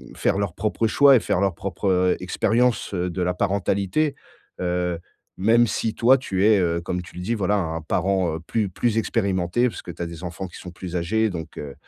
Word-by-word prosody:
faire 95 - +1
leur 100 -4 -1
propre 110 +4 -1
choix 140 +4 +6
et - - +5
faire 95 - 0
leur 95 -3 +1
propre, 95 +2 -3
heu, 90 -1 +3
expérience, 110 +5 +1
heu, 90 -1 -1
de 90 +1 -4
la 90 0 0
parentalité, 100 +9 0 0.5
heu, 90 -1 -1 0.4
même 115 +5 +4
si, 110 0 -2
toi, 130 +3 +5
tu 95 -6 0
es, 110 -2 +5
heu, 85 -2 0
comme 90 +1 -3
tu 85 - -14
le 90 - -6
dis, 115 - -1
voilà, 105 -2 +1
un 80 -3 -2
parent, 90 +1 0
heu, - - -5
plus 105 +4 -1
plus 115 +4 0
expérimenté 100 0 0
parce - - -8
que - - -12
tu 85 - -6
as - - -2
des 85 0 -8
enfants 90 +2 -5
qui 90 - -12
sont 90 - -8
plus 90 0 -7
âgés 105 +5 +1
donc 80 -2 -7
heu, 70 -2 -6
95 Hz, 220 wpm, -23 LUFS, 90-110 Hz, 0.5 s, choix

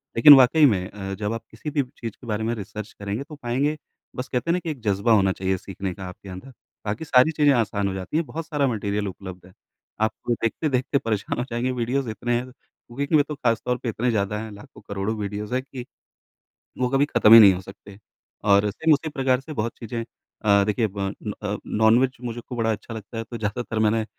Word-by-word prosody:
लेकिन 145 +6 +10
वाक़ई 135 +4 +6
में 95 -7 +2
अ, 95 -1 -6
जब 105 +2 -3
आप 115 0 -5
किसी 110 +8 -6
भी 145 -1 +1
चीज़ 115 -1 -5
के 120 - -16
बारे 105 0 -2
में 115 +1 0
रिसर्च 105 0 -7
करेंगे 100 +5 -3
तो 150 +1 -11
पाएँगे 140 +3 -1 0.4
बस 125 +1 -4
कहते 125 +4 -2
हैं - - +3
ना 180 - +1
कि 170 - -5
एक 145 - -7
जज़्बा 105 +1 +1
होना 95 -3 +4
चाहिए 95 0 -1
सीखने 95 0 -5
का 95 - -8
आपके 95 +2 -12
अंदर। 95 +9 -9 0.3
बाकी 105 +9 -3
सारी 130 +2 +5
चीज़ें 150 -2 +3
आसान 105 -4 0
हो 95 - -2
जाती 95 +10 -3
हैं। 165 - 0
बहुत 155 +6 -6
सारा 145 -3 +1
मटीरियल 105 -3 -2
उपलब्ध 95 -1 -9
है। 90 - -17 0.5
आप 110 - +3
को 120 - +1
देखते-देखते 130 +4 0
परेशान 110 -5 -2
हो - - 0
जाएँगे 120 +2 -1
वीडियोज़ 125 +1 -1
इतने 120 +3 -2
हैं। 125 +1 -4
कुकिंग 130 +1 -8
कि 155 - +2
में 145 - +6
तो 150 - -4
खास 115 -4 0
तौर 125 0 0
पे 120 - -1
इतने 120 +3 -1
ज़्यादा 105 -1 -1
हैं। 110 0 -6
लाखों 105 0 -13
करोड़ों 100 +2 -2
वीडियोज़ 105 +2 -4
हैं 130 - +1
कि 130 -2 -8 1.0
वो 125 - +2
कभी 135 +2 +3
खत्म 110 -6 +5
ही 115 - +12
नहीं 100 -3 +8
हो 90 - -5
सकते। 100 +1 -13 0.5
और 100 0 +4
सेम 160 +9 +3
उसी 155 +2 -1
प्रकार 130 -3 +1
से 155 +4 -9
बहुत 115 -2 -2
चीज़ें 115 0 -4 0.4
अ, 100 -1 +5
देखिए 110 +2 +1
ब 100 0 -9 0.2
न 105 - -3
अ, 105 0 -2
नॉनवेज 115 +4 +3
मुझे 120 -1 -5
खू 125 - -6
बड़ा 115 -1 +1
अच्छा 110 +2 -5
लगता 110 +1 -8
है 115 - -2
तो 120 +1 -8
ज़्यादातर 110 +1 -3
मैंने 110 0 +2
115 Hz, 235 wpm, -24 LUFS, 105-130 Hz, 1.0 s, ही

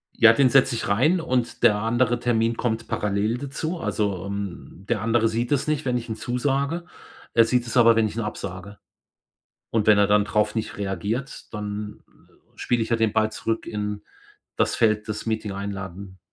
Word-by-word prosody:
Ja, 115 0 +7
den 130 0 +4
setze 135 -1 +4
ich 115 - -3
rein 135 - +3
und 125 -5 -2
der 105 - +6
andere 120 +3 +1
Termin 115 -1 +1
kommt 115 -1 -2
parallel 105 +3 0
dazu. 150 +6 -4
Also, 100 - -2
ähm, 100 -2 -6
der 115 -4 0
andere 115 0 +2
sieht 115 +2 -2
es 145 0 +1
nicht, 150 -3 -1
wenn 125 -1 +1
ich 120 0 -6
ihn 110 - -2
zusage. 140 +8 -1 0.5
Er 115 -1 +6
sieht 125 +1 0
es 120 - -2
aber, 115 -1 +7
wenn 115 -1 +3
ich 105 - -8
ihn 115 - -2
absage. 100 -1 -6 0.9
Und 110 -2 0
wenn 105 -1 +6
er 100 - +5
dann 105 +1 +3
drauf 105 0 0
nicht 110 -1 -3
reagiert, 105 +8 -4
dann 105 0 -5 0.6
spiele 120 -2 0
ich 110 - -4
ja 115 - +3
den 110 -2 +1
Ball 110 0 +1
zurück 115 +1 -3
in 105 -1 -4 0.5
das - - +1
Feld 110 -1 +2
des 110 +1 -4
Meeting-Einladen. 100 -3 -5
110 Hz, 185 wpm, -24 LUFS, 105-120 Hz, 0.9 s, Ja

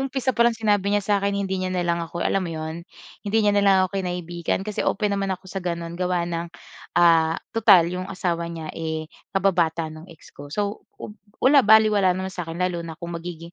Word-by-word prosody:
umpisa 265 -1 -1
pa 235 - -5
lang 230 - -4
sinabi 205 -3 +1
niya 205 0 +1
sa 210 - 0
akin 200 0 0
hindi 190 -1 -2
niya 185 - -1
na 180 -1 -1
lang 170 0 0
ako, 170 +1 -4
alam 195 - +1
mo 180 - -3
'yon, 160 +2 -6 0.3
hindi 210 +1 0
niya 205 - +4
na 205 - +3
lang 200 -1 +5
ako 195 +1 -3
kinaibigan 175 0 -3
kasi 210 0 -4
open 210 -2 0
naman 195 -1 -1
ako 185 - -35
sa 190 +1 -6
gano'n 170 -2 -4
gawa 180 0 -1
ng, 170 0 -3 0.5
ah 165 -1 +5 0.2
tutal 210 -6 +6
'yong 180 +2 -4
asawa 175 -3 -2
niya 165 -2 -7
eh 160 -1 -5 0.2
kababata 170 -4 0
nung 155 +3 -12
ex 165 - -16
ko. 145 0 -11
So 205 +7 -4
ub 210 - -8 0.2
wala 275 +2 +5
balewala 210 -4 +5
naman 190 0 -4
sa'kin 170 -3 -6
lalo 180 -1 -1
na 165 -2 -7
kung 170 +1 -7
magiging 170 0 -7
180 Hz, 215 wpm, -23 LUFS, 170-200 Hz, 0.5 s, tutal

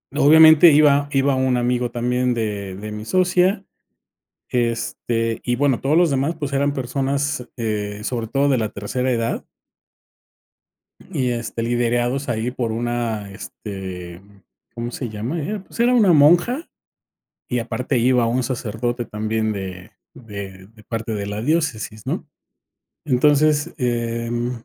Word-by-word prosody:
obviamente 160 +2 +8
iba 145 -1 +4
iba 135 0 +2
un 130 -1 +1
amigo 125 0 0
también 125 +1 0
de 105 -4 -3
de 105 +2 -7
mi 105 +1 -6
socia, 185 - +2 0.9
este, 115 -1 -1
y 120 -1 0
bueno, 140 -2 +1
todos 145 +4 +1
los 175 -2 +4
demás, 140 +4 0
pues, 145 -2 -4
eran 140 +1 +1
personas, 135 +1 -2
eh, 105 -3 -3
sobre 120 -1 -2
todo 140 +2 +1
de 130 -3 +2
la 110 -2 -1
tercera 125 +6 -2
edad. 115 -2 -1 1.7
Y 125 -1 0
este, 115 -1 -4
liderados 120 +3 0
ahí 115 +1 -1
por 120 -3 -2
una 115 -3 -2
este, 95 -3 -8 0.5
¿cómo 120 0 -5
se 125 -2 -5
llama?, 115 +10 -4
era 200 +7 -4
pues, - - -14
era 245 +1 +4
una 210 -7 +5
monja 175 - +4 0.8
y 125 -1 0
aparte 125 +3 -2
iba 125 0 +3
un 120 +2 0
sacerdote 120 0 -3
también, 110 +1 -2
de 95 -3 -6 0.2
de 100 -4 -9
de 110 -1 -19
parte 115 0 -4
de 100 -1 -3
la 105 +1 -4
diócesis, 125 -7 -1
¿no?, - - -3 0.8
entonces, 150 +4 +3
eh, 115 -2 -1
mm, 120 +1 -1
120 Hz, 140 wpm, -21 LUFS, 110-140 Hz, 1.7 s, obviamente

